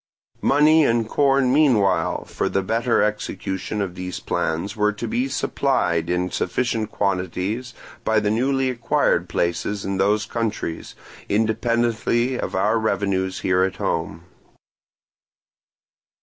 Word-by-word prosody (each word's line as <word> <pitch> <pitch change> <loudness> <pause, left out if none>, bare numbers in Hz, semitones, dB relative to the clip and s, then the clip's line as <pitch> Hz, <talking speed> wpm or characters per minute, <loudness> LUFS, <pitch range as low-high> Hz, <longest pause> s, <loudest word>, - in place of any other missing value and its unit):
Money 155 +3 +5
and 115 -4 +1
corn 135 -1 +2
meanwhile 120 -11 +2
for - - -2
the 95 - 0
better 115 +4 +1
execution 105 -1 -2
of 90 -3 -5
these 90 0 -5
plans 85 +6 -2
were 105 0 +2
to 105 - -5
be 245 +3 0
supplied 110 - 0
in 90 +1 0
sufficient 110 +2 -1
quantities 100 +5 -2 0.3
by 110 0 +2
the 105 0 0
newly 135 +4 +1
acquired 120 -2 +1
places 85 +4 -1
in 95 0 -2
those 105 +2 +2
countries, 110 -7 -4 0.3
independently 115 +3 +1
of - - -3
our 105 +4 +2
revenues 100 -3 -1
here 90 0 +2
at 95 0 0
home. 85 +2 -3
105 Hz, 120 wpm, -22 LUFS, 95-120 Hz, 0.3 s, Money